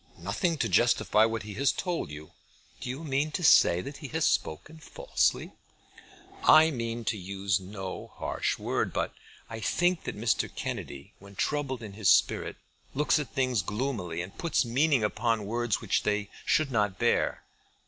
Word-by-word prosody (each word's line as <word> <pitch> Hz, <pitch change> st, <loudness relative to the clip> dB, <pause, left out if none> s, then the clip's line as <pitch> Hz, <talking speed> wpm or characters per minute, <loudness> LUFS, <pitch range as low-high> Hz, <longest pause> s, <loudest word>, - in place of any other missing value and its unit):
"Nothing 115 Hz, -, -1 dB
to 120 Hz, -, 0 dB
justify 110 Hz, +1 st, +3 dB
what 115 Hz, -1 st, -2 dB
he 105 Hz, 0 st, -7 dB
has 135 Hz, +6 st, +2 dB
told 175 Hz, -, -3 dB
you." 75 Hz, +1 st, -10 dB, 0.5 s
"Do -, -, -6 dB
you 135 Hz, +6 st, -5 dB
mean 145 Hz, 0 st, 0 dB
to 180 Hz, -, -3 dB
say 90 Hz, -, +6 dB
that 140 Hz, +8 st, -8 dB
he 145 Hz, -, -7 dB
has 160 Hz, +2 st, -1 dB
spoken 155 Hz, -, -1 dB
falsely?" -, -, -1 dB, 0.9 s
"I 160 Hz, +1 st, +7 dB
mean 115 Hz, -3 st, -4 dB
to 105 Hz, -, -1 dB
use 95 Hz, 0 st, -1 dB
no 95 Hz, 0 st, -7 dB
harsh -, -, -2 dB
word, -, -, -1 dB
but -, -, -1 dB, 0.3 s
I 115 Hz, -1 st, -7 dB
think 175 Hz, -, +1 dB
that -, -, -4 dB
Mr. 110 Hz, +1 st, 0 dB
Kennedy 70 Hz, 0 st, -6 dB
when 100 Hz, 0 st, -14 dB
troubled 130 Hz, -1 st, -2 dB
in 105 Hz, -2 st, -8 dB
his 100 Hz, -2 st, +1 dB
spirit -, -, +3 dB, 0.4 s
looks 150 Hz, +2 st, +2 dB
at 145 Hz, -, -4 dB
things 130 Hz, -5 st, +1 dB
gloomily, 105 Hz, -5 st, -3 dB
and 90 Hz, -, -10 dB
puts 165 Hz, -5 st, +1 dB
meaning 135 Hz, +1 st, +2 dB
upon 110 Hz, 0 st, 0 dB
words 120 Hz, 0 st, -1 dB
which -, -, +1 dB
they 105 Hz, -1 st, -1 dB, 0.2 s
should 150 Hz, -2 st, +2 dB
not 105 Hz, -5 st, +1 dB
bear." -, -, +1 dB
115 Hz, 170 wpm, -28 LUFS, 100-145 Hz, 0.9 s, I